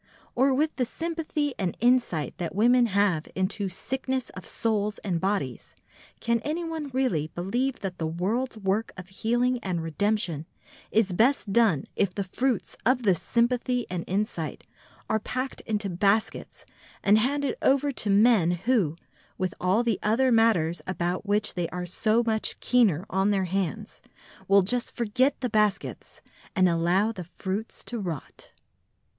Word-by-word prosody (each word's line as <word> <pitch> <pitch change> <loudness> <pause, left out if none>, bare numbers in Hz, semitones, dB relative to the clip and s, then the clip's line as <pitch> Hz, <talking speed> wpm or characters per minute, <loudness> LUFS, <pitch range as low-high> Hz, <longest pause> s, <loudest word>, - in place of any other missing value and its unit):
Or 265 +3 +3
with 300 +4 0
the 255 - +2
sympathy 315 0 -3
and 185 -4 -2
insight 240 - +2
that 175 0 -4
women 240 +3 +4
have 195 -6 +1
into 190 +1 -1
sickness 260 +6 -3
of 185 - -10
souls 210 -2 -1
and 175 -5 -1
bodies, 185 - -2 0.4
can 235 0 +1
anyone 320 +2 -3
really 250 - 0
believe 240 +9 -1
that 190 -3 -5
the 160 - -1
world's 215 +10 -2
work 205 +2 -1
of 180 0 -9
healing 240 +5 0
and 180 -6 -3
redemption 170 -1 -1 0.4
is 205 -4 +2
best 225 0 +2
done 205 -12 +3
if 195 -3 0
the 200 - -1
fruits 245 +6 -1
of 250 +1 +2
this 190 -6 +2
sympathy 245 +1 +1
and 175 -2 -2
insight 190 -4 -2 0.4
are 220 - +1
packed 255 +4 -4
into 210 -2 -1
baskets 200 +4 0 0.4
and 210 +2 +5
handed 280 +4 0
over 280 +1 +3
to 215 -5 -2
men 205 -3 +5
who, 180 - +1 0.4
with 185 -1 -1
all 190 +6 +2
the 230 -4 0
other 250 +5 +2
matters 220 -8 +3
about 180 +2 -2
which 205 +1 +1
they 175 -2 -2
are 180 0 -4
so 220 +6 +1
much 220 -1 -1
keener 210 -9 +3
on 190 +2 +2
their 195 -2 +1
hands, 185 -3 -3 0.5
will 195 0 +5
just 245 +5 -1
forget 250 +5 +1
the 250 - -1
baskets 210 -2 -1 0.3
and 185 -2 +5
allow 175 +5 +2
the 185 -6 -7
fruits 200 +3 -4
to 240 - -5
rot? 170 -8 -6
210 Hz, 150 wpm, -26 LUFS, 185-245 Hz, 0.5 s, and